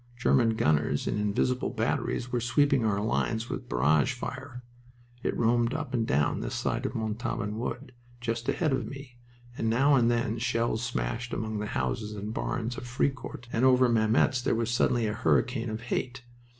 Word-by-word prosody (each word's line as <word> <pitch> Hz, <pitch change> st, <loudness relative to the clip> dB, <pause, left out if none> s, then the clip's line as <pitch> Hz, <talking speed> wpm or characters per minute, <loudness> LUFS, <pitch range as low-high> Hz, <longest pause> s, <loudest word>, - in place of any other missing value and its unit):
German 120 Hz, -2 st, +3 dB
gunners 75 Hz, -7 st, +1 dB
in 105 Hz, -, -1 dB
invisible 105 Hz, +5 st, 0 dB
batteries 120 Hz, +1 st, -1 dB
were 120 Hz, -, 0 dB
sweeping 135 Hz, +2 st, +3 dB
our 105 Hz, -2 st, +1 dB
lines 110 Hz, +2 st, -1 dB
with -, -, -5 dB
barrage 70 Hz, +4 st, +3 dB
fire, 125 Hz, -2 st, -7 dB, 0.6 s
it -, -, -1 dB
roamed 120 Hz, +2 st, +2 dB
up 150 Hz, -5 st, -4 dB
and 115 Hz, -3 st, 0 dB
down 75 Hz, +2 st, +1 dB
this -, -, -4 dB
side 120 Hz, +1 st, -1 dB
of 130 Hz, -, -7 dB
Montauban 110 Hz, -1 st, -2 dB
Wood, 125 Hz, +2 st, -4 dB, 0.3 s
just 115 Hz, 0 st, -2 dB
ahead 155 Hz, -5 st, +1 dB
of 130 Hz, -4 st, -1 dB
me, 135 Hz, -2 st, -10 dB, 0.4 s
and 115 Hz, -, -1 dB
now 135 Hz, +6 st, +4 dB
and 120 Hz, -3 st, +4 dB
then 120 Hz, -1 st, 0 dB
shells 115 Hz, -2 st, 0 dB
smashed 120 Hz, 0 st, -3 dB
among 110 Hz, -1 st, -2 dB
the 105 Hz, -, -3 dB
houses 110 Hz, -4 st, -2 dB
and 105 Hz, +1 st, -5 dB
barns 120 Hz, +1 st, -2 dB
of 125 Hz, -, -7 dB
Fricourt, 125 Hz, -1 st, -2 dB
and 115 Hz, -, +1 dB
over 130 Hz, -1 st, +6 dB
Mametz 115 Hz, +3 st, +3 dB
there -, -, +1 dB
was 115 Hz, 0 st, -1 dB
suddenly 120 Hz, -1 st, +2 dB
a 105 Hz, -, -1 dB
hurricane 115 Hz, -, +1 dB
of 110 Hz, +1 st, -4 dB
"hate." 125 Hz, +2 st, -3 dB
120 Hz, 175 wpm, -28 LUFS, 110-125 Hz, 0.6 s, over